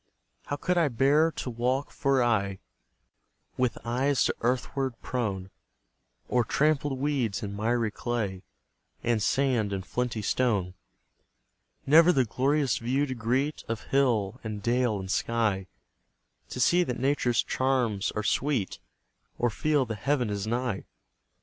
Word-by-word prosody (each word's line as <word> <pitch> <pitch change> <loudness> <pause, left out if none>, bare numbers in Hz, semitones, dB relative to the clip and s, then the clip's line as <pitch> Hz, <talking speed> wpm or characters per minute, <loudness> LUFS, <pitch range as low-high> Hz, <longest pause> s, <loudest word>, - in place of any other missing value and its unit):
How 145 - -1
could 180 +4 0
I 165 - +3
bear 145 +6 +3
to - - -4
walk 125 +4 -1
for 135 -4 +2
aye, 100 -5 +1 1.0
With 125 -2 0
eyes 130 +4 +1
to - - 0
earthward 130 +1 -1
prone, 100 -7 -3 0.8
O'er 125 -1 +2
trampled 145 +2 +1
weeds 130 -8 -1
and 100 -1 -4
miry 115 +1 0
clay, 105 -6 -3 0.6
And 115 -2 +1
sand 125 -3 +1
and 95 -1 -3
flinty 120 -3 -2
stone; 100 -6 +1 1.1
Never 165 +5 +7
the 130 -6 +2
glorious 135 +2 +1
view 130 +5 0
to 130 - -4
greet 130 +6 -1
Of 115 -1 -3
hill 120 -5 +2
and 105 -2 -5
dale, 120 -2 +1
and 95 0 -5
sky; 110 -5 0 0.8
To - - -6
see 175 +8 +4
that 125 -8 -3
Nature's 130 -3 +1
charms 125 -7 0
are 105 - -1
sweet, 120 -2 0 0.6
Or 120 -1 +1
feel 150 +3 +1
that 110 -3 -5
Heaven 130 -6 0
is 100 0 -3
nigh? 120 -3 -2
120 Hz, 135 wpm, -28 LUFS, 110-135 Hz, 1.1 s, Never